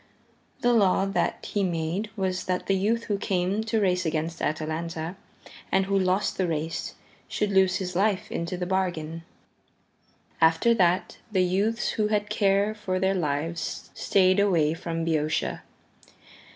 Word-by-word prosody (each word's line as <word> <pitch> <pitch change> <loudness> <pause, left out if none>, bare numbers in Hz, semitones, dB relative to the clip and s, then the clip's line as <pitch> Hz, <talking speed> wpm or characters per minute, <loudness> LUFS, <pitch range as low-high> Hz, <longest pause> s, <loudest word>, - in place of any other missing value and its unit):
The 245 0 +3
law 195 -3 +4
that 195 - -1
he 205 - +1
made 175 +4 -1
was 185 -2 -2
that 180 0 -1
the 195 - +1
youth 215 +5 +1
who 205 -3 -2
came 190 +2 0
to 225 0 +1
race 185 -3 +2
against 160 0 -2
Atalanta 160 +2 -3 0.6
and 190 0 +3
who 200 +1 0
lost 185 +2 +1
the 185 - +2
race 160 0 -3 0.3
should 210 -1 -1
lose 190 -1 +4
his 185 -2 -3
life 205 +1 +1
into 170 +2 -3
the 180 - -2
bargain. 175 -4 -2 1.2
After 165 +8 +5
that 185 -3 +1
the 190 -3 +3
youths 200 +6 0
who 215 -1 0
had 210 0 -1
care 200 0 +2
for 195 -3 -2
their 190 +1 +2
lives 165 -1 -3
stayed 185 0 +3
away 170 -7 +3
from 165 0 -3
Boeotia. 155 -2 0
185 Hz, 150 wpm, -26 LUFS, 165-200 Hz, 1.2 s, After